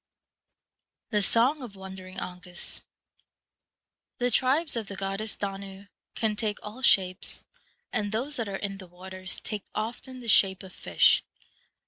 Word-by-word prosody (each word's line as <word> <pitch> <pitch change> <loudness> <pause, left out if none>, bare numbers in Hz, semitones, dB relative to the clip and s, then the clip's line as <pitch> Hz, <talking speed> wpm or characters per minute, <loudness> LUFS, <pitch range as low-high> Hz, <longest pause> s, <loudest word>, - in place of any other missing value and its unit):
The 210 -2 +3
Song 245 +8 +4
of 235 -6 -8
Wandering 190 -1 -9
Aengus. 180 -1 -7 1.4
The 245 0 +1
Tribes 275 +6 +5
of 225 -3 -2
the 200 - -6
goddess 195 +3 -2
Danu 195 0 -6 0.3
can 220 -2 +1
take 210 -1 -1
all 215 +5 -8
shapes, 185 -7 +3 0.5
and 205 -1 0
those 260 +7 -2
that 225 -4 -2
are 195 - -3
in 195 0 -4
the 185 - -10
waters 185 +1 -4
take 210 -3 -3
often 240 +4 -4
the 240 - -9
shape 195 -3 +5
of 185 -1 -11
fish. - - +4
200 Hz, 140 wpm, -28 LUFS, 190-230 Hz, 1.4 s, Tribes